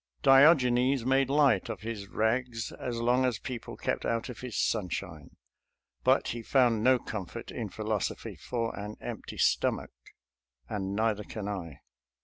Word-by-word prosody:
Diogenes 135 Hz, -3 st, +5 dB
made 135 Hz, 0 st, +3 dB
light 140 Hz, -8 st, +3 dB
of -, -, -5 dB
his 110 Hz, -3 st, -5 dB
rags 115 Hz, +2 st, -1 dB
as 120 Hz, -2 st, -5 dB
long 125 Hz, +2 st, +2 dB
as 125 Hz, -4 st, +1 dB
people 120 Hz, -1 st, -7 dB
kept -, -, -2 dB
out 115 Hz, +2 st, -1 dB
of 120 Hz, -3 st, -8 dB
his 125 Hz, -3 st, -5 dB
sunshine, 90 Hz, -6 st, -2 dB, 0.7 s
but -, -, +3 dB
he 120 Hz, -, -4 dB
found 120 Hz, -3 st, +3 dB
no 130 Hz, +1 st, +5 dB
comfort 100 Hz, -6 st, -6 dB
in -, -, -4 dB
philosophy -, -, -3 dB
for 115 Hz, -2 st, -3 dB
an 105 Hz, +1 st, -6 dB
empty -, -, -7 dB
stomach, -, -, +1 dB, 0.8 s
and 100 Hz, +2 st, -3 dB
neither 110 Hz, -1 st, +1 dB
can 105 Hz, 0 st, -6 dB
I. 90 Hz, -7 st, -5 dB
115 Hz, 145 wpm, -29 LUFS, 105-130 Hz, 0.8 s, Diogenes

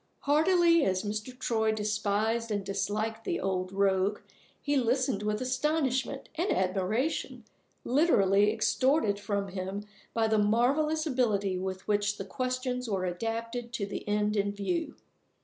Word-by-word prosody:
Heartily 335 Hz, +2 st, +4 dB
as 185 Hz, -3 st, 0 dB
Mr. 215 Hz, +4 st, -4 dB
Troy 220 Hz, -3 st, +1 dB
despised 215 Hz, +2 st, 0 dB
and 205 Hz, -2 st, -2 dB
disliked 210 Hz, +3 st, -2 dB
the 350 Hz, -, -2 dB
old 185 Hz, -1 st, -2 dB
rogue, 195 Hz, +1 st, +1 dB, 0.4 s
he 290 Hz, -1 st, -1 dB
listened 255 Hz, -3 st, +1 dB
with 210 Hz, +1 st, -1 dB
astonishment 265 Hz, 0 st, 0 dB
and 345 Hz, +5 st, -1 dB
admiration 195 Hz, -, -1 dB, 0.4 s
literally 210 Hz, -, +4 dB
extorted 220 Hz, 0 st, +2 dB
from 200 Hz, -1 st, -2 dB
him 190 Hz, +2 st, -4 dB, 0.3 s
by 225 Hz, -1 st, +2 dB
the 220 Hz, -1 st, +2 dB
marvelous 275 Hz, +9 st, +2 dB
ability 215 Hz, -9 st, +1 dB
with 190 Hz, 0 st, -5 dB
which 205 Hz, 0 st, +1 dB
the 195 Hz, -, -5 dB
questions 255 Hz, +2 st, -2 dB
were 190 Hz, -3 st, -1 dB
adapted 230 Hz, +6 st, -3 dB
to 215 Hz, -4 st, -2 dB
the 200 Hz, -, -6 dB
end 210 Hz, 0 st, +1 dB
in 200 Hz, -1 st, +1 dB
view. 315 Hz, -, -2 dB
220 Hz, 135 wpm, -29 LUFS, 200-255 Hz, 0.4 s, Heartily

